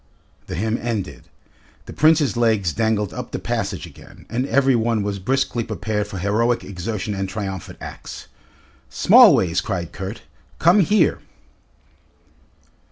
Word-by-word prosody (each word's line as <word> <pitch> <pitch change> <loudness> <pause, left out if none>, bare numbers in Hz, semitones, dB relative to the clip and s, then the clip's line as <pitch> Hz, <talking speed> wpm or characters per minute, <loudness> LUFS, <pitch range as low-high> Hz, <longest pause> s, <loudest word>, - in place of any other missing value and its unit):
The - - -5
hymn 110 +6 -1
ended. 115 -5 -4 0.6
The - - -9
Prince's 155 -3 +3
legs 110 -8 +1
dangled 105 -4 0
up - - -6
the - - -4
passage - - -3
again, - - -15
and 125 +3 -1
every 135 -2 +3
one 115 -2 0
was 100 -1 -3
briskly 130 +2 0
prepared 105 -1 -3
for 100 - -7
heroic 110 +6 +1
exertion 100 +2 -4
and 95 -1 -3
triumphant 95 -2 -6
acts. - - -9 0.6
"Smallways!" 90 -2 +5
cried 90 -5 -4
Kurt, 95 +4 -7 0.3
"come 175 +5 +5
here!" 200 -2 +3
110 Hz, 130 wpm, -21 LUFS, 95-120 Hz, 0.6 s, Smallways